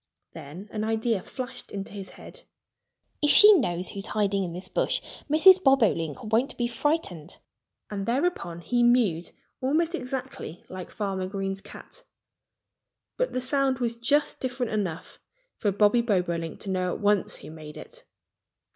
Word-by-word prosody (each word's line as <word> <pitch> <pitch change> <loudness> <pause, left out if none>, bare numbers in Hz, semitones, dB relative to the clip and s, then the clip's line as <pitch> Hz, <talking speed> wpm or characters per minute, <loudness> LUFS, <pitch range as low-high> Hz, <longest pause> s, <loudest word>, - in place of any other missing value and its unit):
Then 165 +9 -9
an 215 -1 -3
idea 225 -1 0
flashed 250 +3 -7
into 195 0 -6
his 195 -2 -6
head. - - -12 0.8
"If 295 - +3
she 415 +9 +9
knows 180 - 0
who's 195 0 -6
hiding 200 -2 +1
in 175 - -4
this 180 +3 -7
bush - - 0 0.3
Mrs. 370 +5 +7
Bobolink 205 - +2
won't 225 +5 0
be 240 - 0
frightened!" 235 - -2 0.5
And 195 -1 -3
thereupon 235 - -1
he 240 +7 0
mewed 235 -9 +3 0.3
almost 315 +6 +1
exactly 255 - -5
like 185 -1 -7
Farmer 195 -3 -3
Green's 195 0 -3
cat. 355 - -12 1.1
But - - 0
the 255 - -1
sound 270 0 +1
was 235 -2 -1
just 285 +6 +1
different 250 -2 -2
enough 190 -6 -3 0.4
for 205 - +1
Bobby 205 +4 +4
Bobolink 175 -7 -1
to 195 - -4
know 185 -1 0
at - - -7
once 205 -1 +1
who - - -10
made 155 -1 -10
it. - - -11
215 Hz, 150 wpm, -27 LUFS, 185-255 Hz, 1.1 s, she